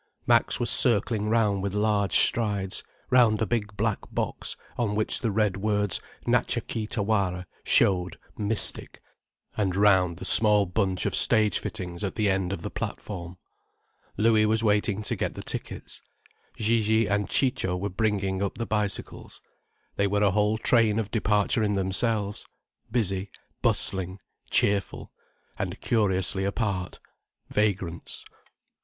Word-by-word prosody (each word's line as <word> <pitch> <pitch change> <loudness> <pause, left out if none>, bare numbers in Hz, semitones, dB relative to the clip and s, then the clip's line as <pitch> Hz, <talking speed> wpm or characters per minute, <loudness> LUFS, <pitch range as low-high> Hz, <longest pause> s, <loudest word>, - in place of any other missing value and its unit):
Max - - +3
was - - +1
circling 105 -2 +3
round 105 -4 +2
with 100 0 -3
large 105 -3 +1
strides, 100 -4 +1 0.3
round 120 -4 +4
a 110 - +1
big 105 -3 -3
black 110 0 0
box - - -4 0.2
on 110 -4 -1
which 110 0 +1
the 115 - 0
red 105 -2 0
words 105 -1 0 0.2
Natcha - - +1
Kee 110 -2 -4
Tawara 100 -5 -1 0.2
showed 90 -3 +2 0.2
mystic, 105 +1 0 0.6
and 95 -4 -1
round 95 -4 +3
the - - -7
small 105 -2 +5
bunch 95 0 -1
of - - -1
stage 110 -1 +3
fittings 90 -1 -6
at 100 - -3
the 105 -3 +1
end 95 -1 -1
of 85 -4 -5
the - - -5
platform. 90 -3 -6 0.8
Louis 110 0 +3
was 110 +1 +1
waiting 105 -1 +1
to - - -1
get - - -3
the - - -7
tickets, - - -6 0.6
Gigi 110 0 +2
and 100 +1 -1
Ciccio 95 -9 +1
were 100 +3 -3
bringing 100 -1 -1
up 100 -1 -2
the 115 - -3
bicycles. 105 -1 -4 0.6
They 100 - +2
were 100 +1 +1
a 100 - +4
whole 105 +2 +1
train 110 -1 +3
of 105 -2 -2
departure 105 0 +1
in 105 -1 +1
themselves, 100 +2 -1 0.4
busy, 100 -4 -1 0.3
bustling, 95 0 0 0.3
cheerful—and 100 -1 -2
curiously 95 -4 0
apart, 100 -2 -2 0.5
vagrants. 95 -5 -2
105 Hz, 135 wpm, -26 LUFS, 95-110 Hz, 0.8 s, small